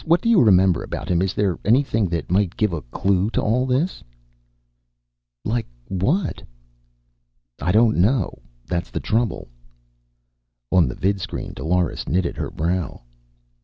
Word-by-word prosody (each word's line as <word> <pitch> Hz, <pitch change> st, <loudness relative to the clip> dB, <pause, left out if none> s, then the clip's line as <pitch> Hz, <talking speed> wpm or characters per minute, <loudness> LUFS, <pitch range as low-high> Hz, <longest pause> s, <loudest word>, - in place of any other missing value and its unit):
What 170 Hz, +1 st, +3 dB
do 230 Hz, -, 0 dB
you 230 Hz, -5 st, +6 dB
remember 95 Hz, -4 st, +4 dB
about -, -, -6 dB
him? 85 Hz, -1 st, +2 dB
Is 95 Hz, -1 st, -1 dB
there 95 Hz, -6 st, 0 dB
anything 115 Hz, -2 st, +2 dB
that 85 Hz, 0 st, -3 dB
might 95 Hz, 0 st, +1 dB
give 105 Hz, -4 st, +1 dB
a 80 Hz, -, -3 dB
clue 95 Hz, -, 0 dB
to -, -, +5 dB
all 125 Hz, +4 st, +1 dB
this?" 140 Hz, +9 st, 0 dB, 1.4 s
"Like 115 Hz, +1 st, -1 dB, 0.2 s
what?" 140 Hz, -, 0 dB, 1.2 s
"I 85 Hz, +7 st, +1 dB
don't 110 Hz, +2 st, +4 dB
know. 105 Hz, +3 st, +1 dB, 0.3 s
That's 85 Hz, +6 st, -3 dB
the -, -, -3 dB
trouble." 110 Hz, -3 st, -1 dB, 1.2 s
On 90 Hz, -6 st, +4 dB
the 65 Hz, -, -5 dB
vidscreen 95 Hz, -1 st, -2 dB
Dolores 90 Hz, +1 st, -1 dB
knitted 90 Hz, -1 st, 0 dB
her -, -, -3 dB
brow. 85 Hz, -4 st, -2 dB
95 Hz, 140 wpm, -22 LUFS, 90-115 Hz, 1.4 s, you